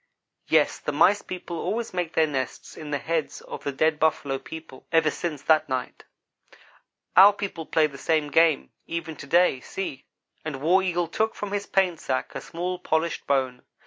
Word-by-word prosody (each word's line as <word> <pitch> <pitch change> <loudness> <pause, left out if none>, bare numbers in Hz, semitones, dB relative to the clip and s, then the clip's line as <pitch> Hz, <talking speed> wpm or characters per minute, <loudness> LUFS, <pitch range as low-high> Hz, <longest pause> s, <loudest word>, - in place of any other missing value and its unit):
Yes - - +3
the - - -3
Mice 205 0 +4
people 175 -2 -6
always 230 -1 -2
make 175 -2 -2
their 160 - +4
nests 135 -4 -4
in 155 - -8
the 145 - 0
heads 160 +1 -2
of - - -8
the 140 - -1
dead 155 +3 +1
Buffalo 145 -4 +1
people, 160 -4 -11
ever 160 -2 +4
since 155 -5 -4
that 155 -2 +3
night. 130 -1 -4 1.1
"Our 200 +2 +9
people 195 -5 -5
play 160 - +3
the 140 -2 -6
same 155 -2 0
game, 165 -3 +3 0.2
even 165 -1 -4
to 140 - -9
day. 170 -3 +4
See," 140 -1 -6 0.4
and 155 -4 -4
War 175 +7 +4
Eagle 175 -2 0
took 220 +6 -1
from 205 -1 -5
his 205 0 -2
paint 185 -4 +1
sack 130 - -2
a - - -5
small, 180 +1 -4
polished 160 -1 -1
bone. 130 -3 0
160 Hz, 180 wpm, -25 LUFS, 145-180 Hz, 1.1 s, Our